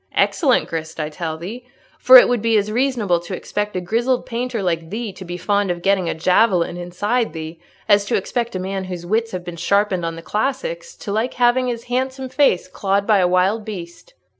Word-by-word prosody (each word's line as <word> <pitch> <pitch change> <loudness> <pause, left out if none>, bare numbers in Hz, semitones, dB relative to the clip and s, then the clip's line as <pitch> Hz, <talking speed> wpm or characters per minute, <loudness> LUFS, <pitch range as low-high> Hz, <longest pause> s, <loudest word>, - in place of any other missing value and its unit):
"Excellent 275 -7 +2
grist, 160 0 -5
I 150 -1 -2
tell 160 0 -5
thee. 210 +10 -7 0.4
For 255 0 +9
it 245 - +8
would 245 -3 0
be 230 0 +3
as 210 +1 0
reasonable 230 -7 +1
to 175 +2 -6
expect 210 +2 -4
a - - 0
grizzled 240 +7 0
painter 235 -2 -3
like 165 -2 -1
thee 220 0 -4
to 190 - -10
be 175 0 -6
fond 200 +2 0
of 175 -1 -3
getting 195 -3 +2
a - - -2
javelin 180 +1 +2
inside 195 +5 -1
thee 160 0 -7 0.3
as 205 -1 +5
to - - 0
expect 235 +3 -2
a - - -1
man 190 +1 -3
whose 180 -2 -6
wits 225 +5 0
have 180 -1 -5
been 175 -1 -7
sharpened 200 +1 +1
on 165 0 -3
the 165 - -10
classics 485 - -3
to 205 - -7
like 220 +5 -1
having 250 +1 +3
his 235 -1 -3
handsome 260 +1 -3
face 255 -9 +2
clawed 195 +2 -1
by 210 -2 +4
a 180 - +3
wild 185 +5 +2
beast." 200 - -9
200 Hz, 215 wpm, -20 LUFS, 175-240 Hz, 0.4 s, For